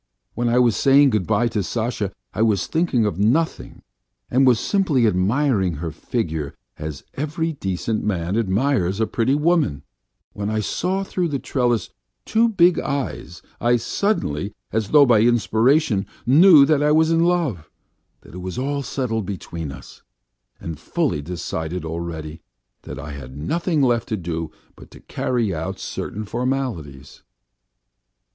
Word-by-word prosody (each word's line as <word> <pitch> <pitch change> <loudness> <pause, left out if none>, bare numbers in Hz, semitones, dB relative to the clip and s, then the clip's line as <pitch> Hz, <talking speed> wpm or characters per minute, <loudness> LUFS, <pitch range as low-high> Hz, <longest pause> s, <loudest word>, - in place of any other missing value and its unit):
When 120 +1 -1
I 120 - +2
was 120 -3 +4
saying 140 0 +5
good 105 -6 0
bye 120 - +2
to 110 -2 -1
Sasha 110 0 -2 0.2
I 100 - -2
was 105 -4 +2
thinking 160 -9 +1
of 100 -4 -2
nothing 135 +11 0 0.5
and 130 +2 +4
was 120 -3 +5
simply 165 - +1
admiring 100 - +1
her 80 +2 -4
figure 80 - -3 0.2
as 75 -2 -6
every 155 +3 -2
decent 105 -2 -3
man 95 -2 -1
admires 105 -2 +1
a 110 - +2
pretty 115 +5 +1
woman; 150 - +1 0.5
when 100 0 -3
I 110 0 -1
saw 185 - -1
through 180 -2 -1
the 145 -3 -2
trellis 120 -6 -1 0.3
two 230 +1 +3
big 180 -4 +4
eyes, 135 - -4 0.2
I 120 +1 +3
suddenly, 110 - -1 0.2
as 110 -2 -1
though 145 -2 +7
by 120 -4 +4
inspiration, 120 0 +2 0.2
knew 150 +2 +7
that 150 0 +2
I 150 0 +3
was 160 +1 +4
in 165 0 +3
love, 165 - 0 0.5
that - - -16
it 90 - -7
was 95 +4 -6
all 140 +2 -1
settled 115 -6 -3
between 85 -6 -5
us, - - -12 0.6
and 80 -3 -7
fully 75 - -1
decided 85 +1 -4
already, 80 -1 -5 0.4
that - - -8
I 75 +2 -7
had 65 -1 -9
nothing 160 - 0
left 120 -3 +1
to 110 - -1
do 85 -3 -4 0.3
but - - -15
to - - -14
carry 115 -6 -1
out 95 +4 -4
certain 105 +3 -5
formalities. 115 - -4
115 Hz, 150 wpm, -22 LUFS, 90-140 Hz, 0.6 s, though